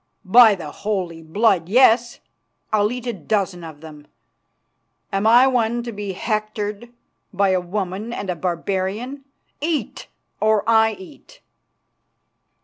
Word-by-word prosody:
"By 220 Hz, +2 st, +7 dB
the 155 Hz, -5 st, -8 dB
Holy 185 Hz, -5 st, -4 dB
Blood, 180 Hz, +1 st, +1 dB
yes. 240 Hz, +1 st, +4 dB, 0.5 s
I'll 210 Hz, 0 st, +2 dB
eat 250 Hz, 0 st, -6 dB
a 240 Hz, -, -2 dB
dozen 190 Hz, -1 st, -2 dB
of 155 Hz, -2 st, -10 dB
them. 150 Hz, -2 st, -12 dB, 1.1 s
Am 195 Hz, +2 st, +1 dB
I 240 Hz, +3 st, +7 dB
one 240 Hz, -2 st, +1 dB
to 235 Hz, -, -5 dB
be 205 Hz, -2 st, -5 dB
hectored 215 Hz, +2 st, -3 dB, 0.4 s
by 200 Hz, 0 st, +1 dB
a 185 Hz, -1 st, +1 dB
woman 190 Hz, +4 st, -4 dB
and 205 Hz, -, -5 dB
a 180 Hz, -, -2 dB
barbarian? 190 Hz, -, -3 dB, 0.4 s
Eat, 315 Hz, 0 st, -3 dB, 0.3 s
or 215 Hz, -1 st, +2 dB
I 220 Hz, -1 st, +4 dB
eat." 380 Hz, +8 st, -15 dB
210 Hz, 130 wpm, -21 LUFS, 185-235 Hz, 1.1 s, By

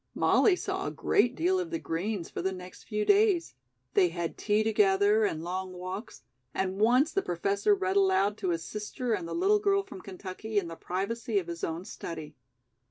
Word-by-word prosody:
Molly 400 Hz, -, +4 dB
saw -, -, -3 dB
a -, -, -2 dB
great 255 Hz, -, +2 dB
deal 365 Hz, +5 st, +2 dB
of 360 Hz, -2 st, -3 dB
the 335 Hz, -, -2 dB
Greens 185 Hz, -, -3 dB
for -, -, -5 dB
the 190 Hz, +2 st, 0 dB
next 185 Hz, -1 st, -10 dB
few 210 Hz, -1 st, -2 dB
days. 405 Hz, -4 st, +3 dB, 0.4 s
They 180 Hz, -, +4 dB
had 170 Hz, 0 st, -4 dB
tea 210 Hz, 0 st, +1 dB
together 210 Hz, 0 st, +3 dB
and 160 Hz, -5 st, -2 dB
long 185 Hz, +1 st, -4 dB
walks, 185 Hz, +4 st, -7 dB, 0.3 s
and 190 Hz, 0 st, -1 dB
once 250 Hz, +8 st, +4 dB
the 390 Hz, -, +1 dB
Professor 200 Hz, -, +1 dB
read 385 Hz, 0 st, 0 dB
aloud 380 Hz, -, +3 dB
to 190 Hz, -, -2 dB
his 165 Hz, -1 st, -1 dB
sister 215 Hz, +3 st, -3 dB
and 180 Hz, -5 st, -2 dB
the -, -, -4 dB
little 400 Hz, +4 st, +3 dB
girl 395 Hz, -1 st, +2 dB
from 390 Hz, -, -10 dB
Kentucky 195 Hz, +3 st, -6 dB
in 180 Hz, -4 st, +1 dB
the 165 Hz, -, -7 dB
privacy 200 Hz, +6 st, -2 dB
of 190 Hz, -, +1 dB
his 170 Hz, 0 st, -7 dB
own 165 Hz, +3 st, -3 dB
study. 155 Hz, -5 st, -7 dB
205 Hz, 195 wpm, -29 LUFS, -, 0.4 s, Molly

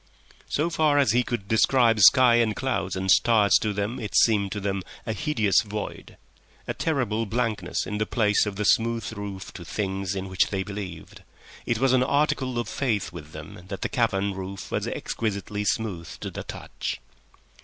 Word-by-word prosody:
So 160 Hz, +4 st, 0 dB
far 155 Hz, -3 st, +2 dB
as 140 Hz, -7 st, +4 dB
he 120 Hz, +2 st, +3 dB
could 120 Hz, -5 st, -4 dB
describe 115 Hz, +1 st, +3 dB
sky 120 Hz, +4 st, +7 dB
and 110 Hz, -3 st, +2 dB
clouds 100 Hz, -8 st, -2 dB
and 95 Hz, 0 st, 0 dB
stars 105 Hz, 0 st, +4 dB
to 105 Hz, -, 0 dB
them 105 Hz, +4 st, -3 dB
it 105 Hz, -, -5 dB
seemed 100 Hz, -4 st, +4 dB
to 105 Hz, -, -3 dB
them 100 Hz, -1 st, -2 dB, 0.2 s
a 110 Hz, -, -2 dB
hideous 110 Hz, -8 st, +2 dB
void, 105 Hz, -1 st, -7 dB, 0.5 s
a -, -, -1 dB
terrible 115 Hz, -8 st, -1 dB
blankness 110 Hz, -5 st, -1 dB
in 105 Hz, +1 st, -4 dB
the 110 Hz, -, 0 dB
place 105 Hz, -2 st, +2 dB
of 100 Hz, -, -4 dB
the 105 Hz, +1 st, -2 dB
smooth 115 Hz, +1 st, +1 dB
roof 100 Hz, -2 st, -7 dB
to 90 Hz, -, -9 dB
things 95 Hz, +1 st, -3 dB
in 95 Hz, 0 st, -4 dB
which 95 Hz, -1 st, +2 dB
they 95 Hz, -2 st, -2 dB
believed—it 100 Hz, +3 st, -7 dB
was 130 Hz, +2 st, +2 dB
an 130 Hz, -, +4 dB
article 130 Hz, -2 st, +1 dB
of 120 Hz, -, -2 dB
faith 110 Hz, -9 st, -1 dB
with 75 Hz, -3 st, -10 dB
them 80 Hz, +3 st, -10 dB
that 95 Hz, 0 st, -6 dB
the -, -, -1 dB
cavern 100 Hz, -6 st, 0 dB
roof 95 Hz, +1 st, -7 dB
was -, -, -1 dB
exquisitely 105 Hz, -1 st, -3 dB
smooth 100 Hz, -5 st, -2 dB
to -, -, -5 dB
the -, -, -6 dB
touch. -, -, -6 dB
105 Hz, 180 wpm, -25 LUFS, 95-120 Hz, 0.5 s, sky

